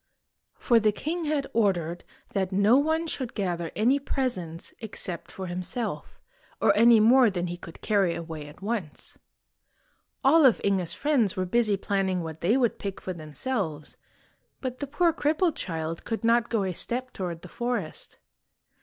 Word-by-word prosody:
For 235 -2 +3
the 215 -1 +3
king 320 +10 -3
had 295 -2 0
ordered 175 -6 +1 0.3
that 190 -1 0
no 200 +5 +4
one 315 +4 +2
should 260 -6 -4
gather 175 -5 -2
any 250 +6 +3
presents 185 - -3
except 195 -5 -5
for 190 - -6
himself, 185 +7 -4 0.4
or - - +4
any 230 +1 +7
more 240 +2 +6
than 180 -3 -2
he 175 0 -4
could 170 -2 -12
carry 195 -5 +2
away 160 -3 -6
at 150 +6 -14
once. 205 -8 -5 1.0
All 315 +4 +6
of 260 -5 +6
Inge's 190 -4 0
friends 265 -10 +1
were 185 - -1
busy 210 +1 +2
planning 190 -2 -1
what 160 -1 -7
they 210 +9 +3
would 240 -4 +1
pick 200 -2 -5
for 185 - -5
themselves, 160 - -4 0.6
but 255 -1 -5
the 285 - -3
poor 335 +4 +2
crippled 315 +2 +1
child 165 -2 -4
could 225 0 -4
not 235 +1 +3
go 225 -4 +1
a 185 -1 -2
step 255 +8 -1
toward 175 -3 -5
the - - -8
forest. 235 -5 -4
205 Hz, 165 wpm, -27 LUFS, 175-250 Hz, 1.0 s, any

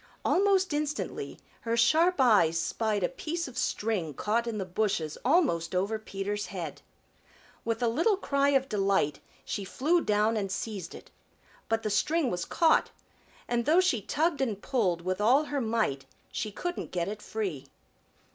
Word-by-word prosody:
Almost 385 -3 +3
instantly 300 0 -3 0.2
her 230 0 -2
sharp 320 +10 +4
eyes 200 -10 +4
spied 215 +1 -1
a - - +3
piece 325 +5 -4
of 255 - -11
string 205 - -1
caught 230 - 0
in 225 -2 -2
the 195 - -2
bushes 185 -5 -1
almost 245 - +2
over 200 +4 0
Peter's 205 -1 -4
head. 175 -2 -6 0.8
With 230 +1 -2
a - - +3
little 335 - +2
cry 280 -6 +1
of 270 -1 +2
delight 195 - +1 0.3
she 205 - -3
flew 310 - +1
down 210 +2 +2
and 195 -2 -2
seized 190 -3 -4
it. - - -13 0.6
But 225 0 0
the 215 - -1
string 305 +6 +1
was 175 -1 -2
caught, 325 -2 +3 0.6
and 240 -1 0
though 325 +4 +5
she 365 - +2
tugged 305 - 0
and 220 -7 -1
pulled 195 -10 0
with 185 +2 -2
all 255 +8 +5
her 290 -2 -2
might 220 - 0 0.3
she 215 - -3
couldn't 350 - -4
get 175 -2 -2
it 210 +1 -5
free. 185 -13 -4
225 Hz, 165 wpm, -29 LUFS, 195-280 Hz, 0.8 s, though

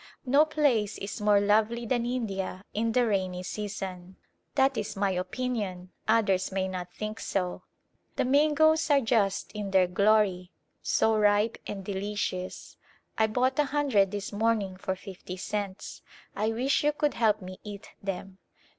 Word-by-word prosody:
No 280 +4 +5
place 280 -9 +1
is 205 +2 -6
more 210 -1 +5
lovely 215 +3 +2
than 240 0 0
India 195 -6 -3
in 225 +2 0
the 245 +1 +3
rainy 185 -4 -1
season; 190 -2 -5 0.4
that 270 -1 +3
is 215 -1 -3
my 195 0 +1
opinion, 185 -1 -3 0.2
others 200 -5 +2
may 190 0 0
not 180 -1 -5
think 215 +1 -5
so. 180 -2 -2 0.5
The - - +1
mangoes 310 +4 +4
are 285 -1 +6
just 220 -6 +1
in 210 -2 -4
their 190 -1 +4
glory, 195 -1 +2 0.3
so 220 0 +2
ripe 210 +1 +3
and 195 -2 -6
delicious. 195 -2 -4 0.4
I 220 - +3
bought 255 +6 +1
a 295 - +4
hundred 270 -9 +2
this 205 +1 -5
morning 210 -3 +1
for 190 0 -3
fifty 190 -1 -9
cents. 200 0 -4 0.3
I 210 +2 0
wish 260 +7 +1
you 295 0 +3
could 295 0 0
help 220 -2 +2
me 185 -1 -9
eat 205 -1 -9
them. 195 -1 -5
210 Hz, 155 wpm, -28 LUFS, 190-235 Hz, 0.5 s, are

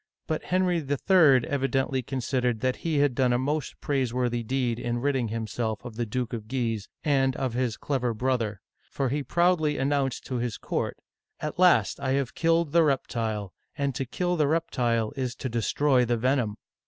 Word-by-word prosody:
But 155 - -3
Henry 180 -1 +2
III. 145 -2 +4
evidently 135 -1 0
considered 125 -2 -1
that 130 -1 0
he 160 -3 -1
had 145 -2 +3
done 125 0 +2
a - - +3
most 145 +3 -2
praiseworthy 125 -3 0
deed 120 0 -1
in 120 0 -2
ridding 130 -1 0
himself 110 0 -3
of 120 -3 -7
the 120 0 -2
Duke 125 +2 -3
of 110 -2 -5
Guise 115 -4 -2
and 135 -3 +2
of 130 -3 -2
his 125 -2 -1
clever 130 -4 -1
brother; 115 -4 -1 0.3
for 135 -2 -1
he 145 +4 -1
proudly 165 -1 +2
announced 135 -1 0
to 130 - -3
his 120 -2 -2
court: - - -3 0.4
"At 150 +3 -5
last 180 -1 +4
I 135 -1 0
have 135 -2 -1
killed 165 -2 +2
the 170 +2 +5
reptile, 115 - -1 0.2
and 140 -1 0
to 135 +1 -3
kill 180 +7 -1
the 150 -2 +3
reptile 120 -8 0
is 130 -3 -2
to 130 - -4
destroy 125 +3 +2
the 120 0 +1
venom 125 -3 +1
130 Hz, 180 wpm, -27 LUFS, 120-145 Hz, 0.4 s, the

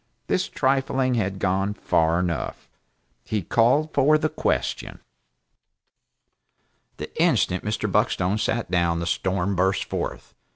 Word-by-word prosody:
This - - 0
trifling 130 -1 +1
had 100 -5 -1
gone 95 +2 0
far 80 -3 +1
enough. 90 -3 -3 0.6
He 105 -3 -2
called 130 - +2
for 145 +3 +4
the 155 0 0
question. 65 - -2 2.0
The - - -8
instant 90 - +2
Mr. 105 +1 -2
Buckstone 95 +4 +1
sat 115 -3 -1
down, 85 -2 +1
the 85 - -3
storm 95 +2 -1
burst 95 +2 +1
forth. - - -5
100 Hz, 120 wpm, -24 LUFS, 90-125 Hz, 2.0 s, for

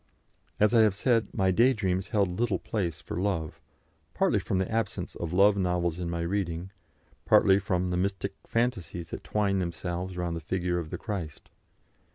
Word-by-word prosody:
As 105 +2 +4
I 115 - +6
have 105 -3 +4
said, 115 -1 +2
my 95 -1 +2
day 120 +8 +4
dreams 95 -4 -1
held 100 -4 0
little 120 -3 +1
place 90 -8 -3
for - - -6
love, 90 -6 -2 0.5
partly - - +2
from 95 - -2
the 95 0 0
absence 115 0 -2
of 85 -2 -4
love 100 +3 +5
novels 90 -3 0
from 90 -1 -3
my 85 0 -2
reading, 85 0 -2 0.5
partly 95 0 +5
from 90 -3 -1
the 90 - 0
mystic 95 +1 -1
fancies 100 -8 -2
that - - -6
twined 100 -2 0
themselves 90 +1 -4
round 85 -1 -2
the 85 - -5
figure 90 +2 -1
of 80 -2 -6
the - - -4
Christ. 90 -9 -6
95 Hz, 180 wpm, -28 LUFS, 85-100 Hz, 0.5 s, I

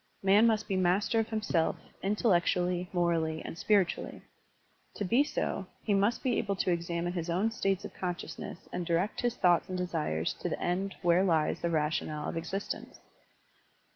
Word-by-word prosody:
Man 200 +4 +6
must 220 -2 +1
be 195 - -1
master 185 +5 +2
of 225 - -1
himself, 210 -7 0 0.3
intellectually, 180 -3 +1
morally, 165 -3 0
and - - -6
spiritually. 195 0 +1 0.7
To 205 - -2
be 240 +9 +4
so, 195 -8 -2 0.2
he 210 - +1
must 200 +4 +2
be 255 -3 +1
able 200 -3 -1
to 185 - 0
examine 170 0 -1
his 170 -1 -3
own 190 +7 +1
states 195 -4 -1
of - - -8
consciousness 180 -1 -5
and 180 - -2
direct 170 +4 0
his 240 -1 0
thoughts 175 +1 +3
and 185 - -2
desires 155 - -1
to - - -1
the - - -3
end 190 +3 -1
where 175 +1 +4
lies 165 -5 +1
the 170 - 0
rationale 155 -1 -1
of - - -4
existence. 180 +5 -4
180 Hz, 170 wpm, -30 LUFS, 170-200 Hz, 0.7 s, Man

